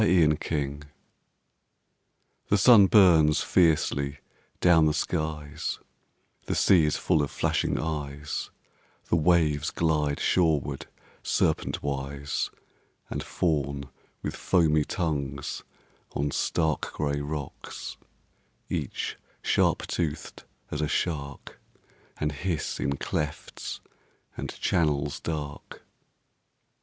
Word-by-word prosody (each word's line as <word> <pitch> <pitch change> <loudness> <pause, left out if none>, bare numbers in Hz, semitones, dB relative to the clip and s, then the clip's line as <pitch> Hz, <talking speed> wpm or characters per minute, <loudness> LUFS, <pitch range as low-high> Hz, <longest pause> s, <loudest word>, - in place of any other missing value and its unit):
A 90 -6 +5
PICTURE 75 -2 -1 1.7
THE 100 - +4
sun 105 -1 +8
burns 85 -8 +6
fiercely 70 -4 +2 0.4
down 80 -3 +5
the 75 - +1
skies; 75 -1 -2 0.7
The - - 0
sea 90 -5 +5
is 75 - +1
full 80 - +2
of 70 - -1
flashing - - 0
eyes; 75 -2 -4 0.6
The - - +3
waves 80 -3 +3
glide 75 -3 0
shoreward 80 -6 +1 0.3
serpentwise 70 0 -1 0.6
And - - -2
fawn 70 -5 -1 0.3
with - - -3
foamy 80 -5 +3
tongues 70 -5 -2 0.5
on 70 +1 -1
stark 80 0 0
Gray 70 -1 -1
rocks, 70 -1 -6 0.7
each - - -3 0.3
sharp - - +2
toothed 80 -3 -3 0.3
as 75 - -2
a 75 - +1
shark, 70 -3 -3 0.6
And 75 0 -1
hiss 80 +1 -3
in 70 0 -1
clefts 75 +2 -4 0.5
and - - -5
channels 75 -3 +1
dark. 75 -3 -6
75 Hz, 95 wpm, -27 LUFS, 70-80 Hz, 1.7 s, sun